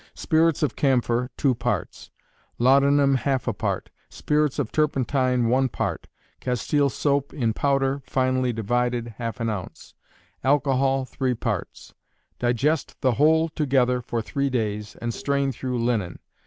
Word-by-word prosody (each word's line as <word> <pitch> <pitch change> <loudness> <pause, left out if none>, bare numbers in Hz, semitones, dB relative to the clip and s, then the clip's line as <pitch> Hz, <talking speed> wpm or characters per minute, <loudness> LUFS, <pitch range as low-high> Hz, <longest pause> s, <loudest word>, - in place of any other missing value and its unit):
Spirits 160 -1 +2
of 150 - 0
camphor, 125 -2 +1
two 135 -3 +2
parts; 115 - -3 0.5
laudanum, 140 +2 +4
half 135 -1 -1
a - - +1
part; - - -3 0.2
spirits 150 -2 0
of - - -2
turpentine, 130 -4 +1
one 130 +2 +2
part; - - -3 0.3
castile 140 +3 0
soap 140 +1 0
in 115 -6 0
powder, 140 +1 0
finely 130 -1 +1
divided, 120 +2 -1
half 115 +1 -4
an 115 - -1
ounce; 105 -5 -6 0.5
alcohol, 135 -1 +2
3 130 -1 -2
parts. - - -4 0.5
Digest 135 +6 0
the 130 - +3
whole 160 +6 +3
together 130 -5 +1
for 115 -1 -3
three 140 +4 -1
days, 105 -4 -2
and 115 +1 -4
strain 140 +1 0
through 125 0 -4
linen. 115 -7 -1
130 Hz, 135 wpm, -24 LUFS, 120-140 Hz, 0.5 s, laudanum